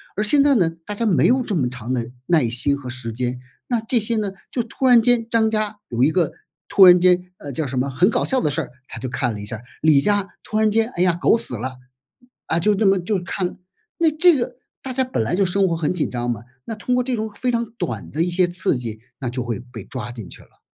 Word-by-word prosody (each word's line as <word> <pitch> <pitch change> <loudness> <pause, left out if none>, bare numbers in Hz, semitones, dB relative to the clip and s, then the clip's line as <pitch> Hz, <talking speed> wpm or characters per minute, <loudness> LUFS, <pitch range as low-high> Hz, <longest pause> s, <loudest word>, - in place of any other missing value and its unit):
而 210 - 0
现 280 +7 +5
在 285 -1 +4
呢， 180 -8 +3 0.2
大 210 - -5
家 230 - -1
没 170 - +3
有 255 +1 +3
这 210 - -2
么 135 -7 +1
长 125 -1 -6
的 120 -1 -3 0.2
耐 160 -8 +3
心 130 +5 +4
和 130 -3 -8
时 120 -2 -2
间， 125 +2 -3 0.3
那 240 -3 0
这 230 +1 +1
些 225 +2 -2
呢， 210 -3 -1 0.2
就 240 - -1
突 235 +3 -4
然 245 -2 +7
间 230 0 +2
张 225 -1 +2
家 215 -1 -2
有 120 0 -2
一 145 - +4
个 175 -2 +1 0.4
突 195 - +7
然 180 -1 +8
间， 180 0 +3
呃， 145 - -7
叫 145 +3 -3
什 130 0 -4
么 135 +2 -1
很 140 +9 +2
搞 - - 0
笑 265 - +1
的 150 - 0
事 160 - 0
儿， 140 - -8 0.2
他 - - -8
就 130 - -4
看 125 -2 -1
了 105 - -7
一 - - -7
下 110 - -4
儿。 110 - -15 0.2
李 155 -2 +5
家 205 +4 +1
突 215 - -3
然 215 0 +3
间， 225 +2 +1
哎 175 - -3
呀， 180 -2 +3
狗 225 - +4
死 125 - +1
了。 130 +3 -5 0.7
啊， 160 - +1
就 210 +4 +2
那 210 +2 0
么 195 -1 +4
就 185 +1 -2
看， 180 0 -3 0.4
那 335 -2 +3
这 340 +2 +5
个 240 0 -4 0.2
大 265 - -5
家 260 +1 +1
本 255 - -2
来 135 +11 0
就 195 +1 +2
生 190 +2 +2
活 165 -2 -1
很 160 +2 -1
紧 175 - 0
张 120 0 -3
嘛， 115 -4 -3 0.2
那 225 - -5
通 235 +4 -2
过 250 - +2
这 250 0 -1
种 220 -1 -4
非 250 +4 -1
常 235 -1 -2
短 110 - -4
的 155 - -2
一 175 - +1
些 180 +1 +3
刺 175 -3 0
激， 115 -3 -5 0.2
那 130 - -3
就 125 0 -3
会 115 -4 -4
被 120 -4 -11
抓 120 -3 -6
进 115 -5 -9
去 - - -12
了。 - - -24
180 Hz, 290 characters per minute, -21 LUFS, -, 0.7 s, 然